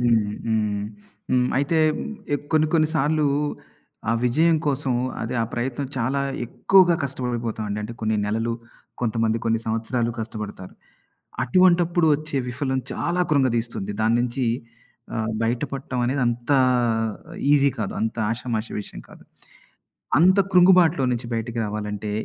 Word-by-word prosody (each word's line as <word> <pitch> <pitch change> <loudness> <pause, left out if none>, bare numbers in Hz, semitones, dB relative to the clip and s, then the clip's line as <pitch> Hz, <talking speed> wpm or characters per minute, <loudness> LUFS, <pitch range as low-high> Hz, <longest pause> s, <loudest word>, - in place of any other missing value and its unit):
హ్మ్, 115 -4 +2
హ్మ్. 105 -2 0 0.5
హ్మ్. 125 -1 +3
అయితే 145 +4 +1 0.6
ఎ - - +2 0.2
కొన్ని, 155 0 +4
కొన్ని 155 -1 +4
సార్లు 150 0 +2 0.8
ఆ - - +3
విజయం 160 +7 +3
కోసం, 135 -2 0 0.3
అదే 115 +3 -3
ఆ - - +1
ప్రయత్నం 130 +3 -2
చాలా 130 +4 0 0.3
ఎక్కువగా 185 +4 +4
కష్టపడిపోతామండి. 120 -5 -3
అంటే 110 +2 -5
కొన్ని 110 -1 0
నెలలు, 115 +2 -1 0.5
కొంతమంది 115 -1 0
కొన్ని 115 0 +2
సంవత్సరాలు 115 +2 -1
కష్టపడతారు. 105 -4 -7 0.7
అటువంటప్పుడు 175 +3 +4
వచ్చే 155 -1 -4
విఫలం 130 +1 -1
చాలా 180 +1 0
కృంగదీస్తుంది. 120 -7 0
దాని 115 +1 +3
నుంచి 125 +1 -1 0.7
ఆహ్, 110 0 -1
బయటపడటం 125 +2 -2
అనేది 130 +2 0
అంతా 120 +4 +1 1.0
ఈజీ 140 -1 +4
కాదు. 105 - -2
అంత 110 +1 -1 0.2
ఆషామాషీ 115 -2 -3
విషయం - - -10
కాదు. - - -15 1.0
అంత 185 +4 +5 0.2
కృంగుబాటులో 180 -4 +6
నుంచి 120 -1 -3
బయటికి 115 +1 -3
రావాలంటే 105 0 -4
120 Hz, 125 wpm, -23 LUFS, 115-145 Hz, 1.0 s, కృంగుబాటులో